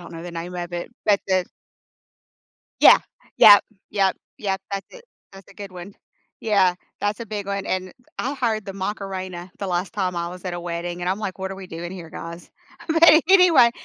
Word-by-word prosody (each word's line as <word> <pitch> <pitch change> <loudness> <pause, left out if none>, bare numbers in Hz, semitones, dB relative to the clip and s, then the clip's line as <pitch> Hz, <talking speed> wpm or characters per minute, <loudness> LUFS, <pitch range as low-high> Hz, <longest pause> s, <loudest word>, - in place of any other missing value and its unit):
don't 175 -1 -11
know 165 - -8
the 175 - -7
name 170 +2 -6
of 175 0 -5
it, 175 +5 -5 0.2
but 205 -2 +4
the 185 -1 +2 1.4
Yeah, - - +9 0.4
yep, 205 -1 +9 0.3
yep, 195 -2 +1 0.2
yep, 195 -2 -2
that's 195 -1 -4
it, - - -14 0.3
that's 195 -1 -14
a - - -17
good 200 -1 -9
one. 180 +2 -10 0.5
Yeah, 195 -5 +3 0.3
that's 205 +2 -1
a 230 - -6
big 205 -2 -5
one, 200 0 -3
and 185 0 -3 0.3
I 270 +4 -2
hired 225 -5 -1
the 195 - -5
Macarena 190 -2 -5
the 200 - -4
last 180 0 -2
time 185 -3 -1
I 170 0 -2
was 180 +1 -10
at 180 - -3
a 175 - -5
wedding, 175 0 -4
and 180 - -2
I'm 190 +3 0
like, 200 -3 -5
"What 190 0 -4
are - - -5
we 195 - -9
doing 170 0 -7
here, 170 -4 -9
guys," 170 +2 -9 0.4
but 325 0 +7
anyway, 360 -10 +7
190 Hz, 205 wpm, -23 LUFS, 175-205 Hz, 1.4 s, Yeah